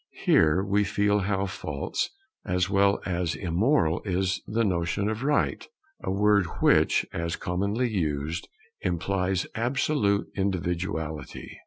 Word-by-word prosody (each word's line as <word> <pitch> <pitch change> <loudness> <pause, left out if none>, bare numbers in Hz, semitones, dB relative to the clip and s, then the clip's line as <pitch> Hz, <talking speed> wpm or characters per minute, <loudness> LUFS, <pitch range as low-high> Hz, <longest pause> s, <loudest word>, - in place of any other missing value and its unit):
Here 80 +4 +4
we 100 +1 +2
feel 100 +1 +1
how 95 0 0
false 75 -7 -3 0.3
as 90 +1 0
well 100 0 +3
as 90 -2 -1
immoral 90 - +1
is 95 -1 0
the 115 +2 +1
notion 90 +1 0
of 110 +1 -2
Right, 145 +2 +1 0.4
a - - -2
word 100 -1 +3
which, - - +4
as 85 0 -2
commonly 100 +7 -1
used, 80 -6 -2 0.3
implies 90 +2 0
absolute 120 -3 +1
individuality. 90 -4 -3
95 Hz, 120 wpm, -27 LUFS, 85-105 Hz, 0.4 s, Here